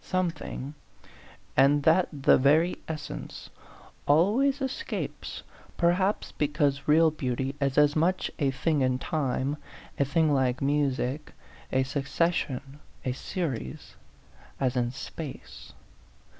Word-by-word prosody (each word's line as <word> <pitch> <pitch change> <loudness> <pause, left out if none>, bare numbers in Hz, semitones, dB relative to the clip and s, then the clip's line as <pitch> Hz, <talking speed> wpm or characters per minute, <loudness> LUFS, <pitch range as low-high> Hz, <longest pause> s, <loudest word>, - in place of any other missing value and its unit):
Something 170 -6 -3 0.8
and 140 +2 +4
that 165 +4 +4
the 140 -3 +4
very 155 +6 +3
essence 145 - -7 0.6
always 220 - +3
escapes, 270 - -4 0.3
perhaps 185 +4 +1
because 145 -2 0
real 160 +1 +5
beau 130 -5 -2
ty 135 +2 -2
is 135 -1 0
as 150 0 +5
much 175 +4 +1
a 140 -3 +2
thing 145 +2 0
in 130 -1 +2
time 140 0 -1 0.4
a - - +5
thing 155 +2 +2
like 130 -2 +1
music, 140 0 0 0.4
a 130 0 +2
succession, 140 0 -1 0.3
a 130 - +1
series 130 - -4 0.6
as 130 -1 0
in 120 -1 +1
space. 140 +3 -8
145 Hz, 115 wpm, -28 LUFS, 135-165 Hz, 0.8 s, real